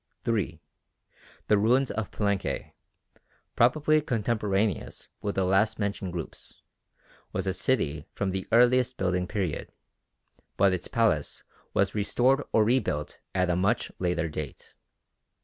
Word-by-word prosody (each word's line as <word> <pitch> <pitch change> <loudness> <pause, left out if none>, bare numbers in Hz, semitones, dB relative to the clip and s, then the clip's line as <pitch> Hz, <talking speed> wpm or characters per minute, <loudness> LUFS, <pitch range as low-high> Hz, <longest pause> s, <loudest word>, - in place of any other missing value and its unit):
3. 100 -8 -1 0.9
The 105 - +4
ruins 125 +5 +3
of 110 -2 -3
Palenque, 100 -2 -2 0.8
probably 155 +5 +4
contemporaneous 105 - -1
with 100 - -2
the 95 - +2
last 95 +4 +2
mentioned 100 -3 -2
groups, 85 -2 -7 0.7
was 95 0 -2
a 95 - 0
city 80 - -1
from 100 -1 -1
the 95 0 -4
earliest 125 +2 +4
building 90 -1 0
period, 95 -7 -3 0.9
but 100 -1 +4
its 90 -1 -3
palace 105 -11 0 0.3
was - - +2
restored 125 +6 +2
or 110 - +4
rebuilt 105 - 0 0.2
at 90 -1 +2
a - - +1
much 100 +7 +1
later 90 -2 0
date. 75 -1 -7
100 Hz, 125 wpm, -28 LUFS, 90-115 Hz, 0.9 s, The